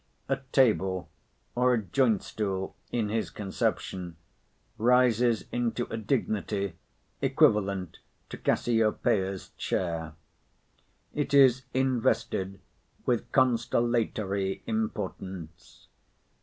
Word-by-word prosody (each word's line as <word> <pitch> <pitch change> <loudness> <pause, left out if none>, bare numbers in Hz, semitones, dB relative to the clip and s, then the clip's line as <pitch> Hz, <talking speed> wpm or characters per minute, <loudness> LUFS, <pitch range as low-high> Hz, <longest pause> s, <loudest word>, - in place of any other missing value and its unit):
A 135 - +1
table, 95 -8 +2 0.4
or 125 0 +3
a 110 - -1
joint 110 +2 +2
stool, 95 -3 -3 0.2
in 115 -3 0
his 110 +1 -1
conception, 95 -3 -3 0.6
rises 120 -1 +3
into 120 0 -1
a - - -2
dignity 105 -5 -1 0.5
equivalent 100 -4 +2 0.3
to - - -7
Cassiopeia's 105 -4 +1
chair. 80 -3 -2 1.0
It 145 -1 0
is 130 -2 +6
invested 120 -7 0 0.5
with 120 -2 0
constellatory 115 -6 +1
importance. 95 -6 -5
110 Hz, 85 wpm, -28 LUFS, 95-120 Hz, 1.0 s, is